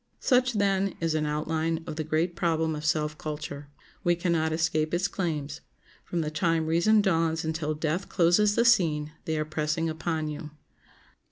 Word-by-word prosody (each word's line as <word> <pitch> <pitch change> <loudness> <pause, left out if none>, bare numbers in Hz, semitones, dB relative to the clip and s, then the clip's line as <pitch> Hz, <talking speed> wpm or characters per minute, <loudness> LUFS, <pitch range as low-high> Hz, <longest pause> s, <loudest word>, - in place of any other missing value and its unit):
Such, 250 -1 +3
then, 195 -2 +1
is 165 -1 0
an 155 -1 0
outline 160 +2 -1
of - - -5
the 155 - -2
great 160 +3 0
problem 160 -2 0
of 150 - -6
self 150 0 0
culture. 145 -2 -6 0.3
We 175 -2 +3
can 175 +1 -1
not 160 -1 +1
escape 160 0 0
its 185 +3 +1
claims; 155 -5 -3 0.4
from 175 - -2
the 155 -1 -3
time 165 0 +1
reason 190 +7 +3
dawns 165 -4 +1
until 160 -1 -2
death 160 +5 -2
closes 200 +4 +3
the 235 - +3
scene 155 -10 +3
they 160 -1 -1
are 155 - -1
pressing 155 +1 -1
upon 160 0 -2
you. 150 +1 -6
160 Hz, 175 wpm, -27 LUFS, 155-175 Hz, 0.4 s, Such